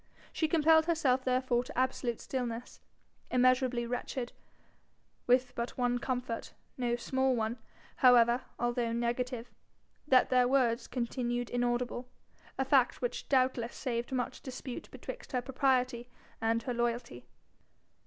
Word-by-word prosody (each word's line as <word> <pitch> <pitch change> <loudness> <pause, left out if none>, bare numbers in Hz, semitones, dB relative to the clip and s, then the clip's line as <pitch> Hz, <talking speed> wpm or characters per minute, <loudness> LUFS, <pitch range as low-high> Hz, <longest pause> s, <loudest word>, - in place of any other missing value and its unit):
She 315 - +1
compelled 320 0 +4
herself 270 -6 +2
therefore 255 -1 +1
to 270 +1 -10
absolute 255 -2 0
stillness, 245 -2 -4 0.5
immeasurably 250 -1 +3
wretched, 245 +1 -3 1.0
with 250 0 +3
but 235 0 -4
one 245 -1 +1
comfort 250 -2 -3 0.2
no 240 -2 0
small 260 +2 +1
one, 225 +1 -2 0.4
however, 245 -1 +6 0.2
although 240 -1 0
negative 240 +1 -2 0.6
that 260 -2 +4
their 250 -1 +5
words 245 -3 +2
continued 240 -1 -2
inaudible, 245 0 -1 0.5
a 265 - 0
fact 260 -2 +3
which 245 0 -3
doubtless 255 -3 +1
saved 240 -2 -3
much 250 -2 -2
dispute 255 -1 -7
betwixt - - -9
her 250 - +1
propriety 255 -2 +1 0.3
and 225 0 +1
her 250 - -2
loyalty. 235 - -2
250 Hz, 125 wpm, -32 LUFS, 240-260 Hz, 1.0 s, however